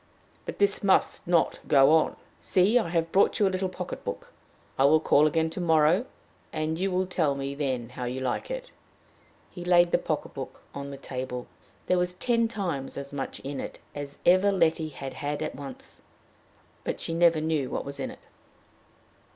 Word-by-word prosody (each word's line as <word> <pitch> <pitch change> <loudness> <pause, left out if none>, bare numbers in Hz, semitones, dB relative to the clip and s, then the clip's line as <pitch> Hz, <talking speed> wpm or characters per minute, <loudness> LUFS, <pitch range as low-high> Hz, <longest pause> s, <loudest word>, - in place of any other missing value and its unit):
But - - -5
this 200 0 +2
must 195 -3 +2
not 170 -2 +2
go 135 +1 +6
on! 160 -1 +3 0.2
See, 200 +7 +3
I 195 - -2
have 165 -1 0
brought 195 - +4
you 205 - +4
a - - 0
little 185 0 -1
pocket 180 -1 -6
book. - - -6 0.4
I 135 - +2
will 155 +3 +6
call 150 -1 +4
again 160 +1 +1
tomorrow, 165 +5 +3 0.4
and 155 +1 -2
you 195 +1 +1
will 185 0 +1
tell 160 -6 0
me 140 0 -3
then 130 -5 -2
how 125 0 -6
you 125 +2 -3
like 130 - -2
it." - - -5 0.8
He 175 - -8
laid 175 -1 +5
the - - +3
pocket - - -3
book - - -8
on 140 0 -6
the 140 - -7
table. 125 -2 -5 0.4
There 180 - +2
was 180 0 0
ten 230 +3 +1
times 175 -12 -3
as 140 0 -6
much 135 -1 -4
in 140 0 -5
it - - -6 0.2
as 145 -1 -7
ever 185 +3 +5
Letty 165 -4 +2
had 135 -2 -7
had 145 0 -3
at - - -3
once. 135 -1 -10 0.8
But - - -3
she 165 - -3
never 165 -1 +4
knew 155 -4 0
what - - -3
was 140 0 -7
in - - -3
it. - - -12
160 Hz, 190 wpm, -27 LUFS, 140-180 Hz, 0.8 s, go